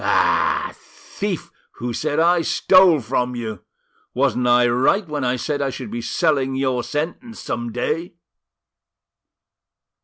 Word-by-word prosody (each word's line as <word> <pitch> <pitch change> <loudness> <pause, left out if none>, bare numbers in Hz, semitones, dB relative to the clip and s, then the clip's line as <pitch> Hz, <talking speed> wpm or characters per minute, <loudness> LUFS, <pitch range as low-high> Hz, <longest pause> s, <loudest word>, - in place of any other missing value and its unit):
Ah! - - +2
thief 200 -4 -6 0.2
who 120 0 -5
said 150 +5 -1
I 170 +1 +4
stole 175 0 +4
from 125 +1 -1
you! 110 -5 -5 0.5
Wasn't 125 -2 +1
I 120 0 +5
right 130 - +2
when 150 -3 -3
I 125 0 +1
said 145 +3 -2
I 140 - 0
should 125 -4 -7
be 120 - -4
selling 135 -1 0
your 130 -2 0
sentence 175 - -4
some 120 -1 -4
day?" 160 +9 -3
135 Hz, 130 wpm, -21 LUFS, 125-165 Hz, 0.5 s, I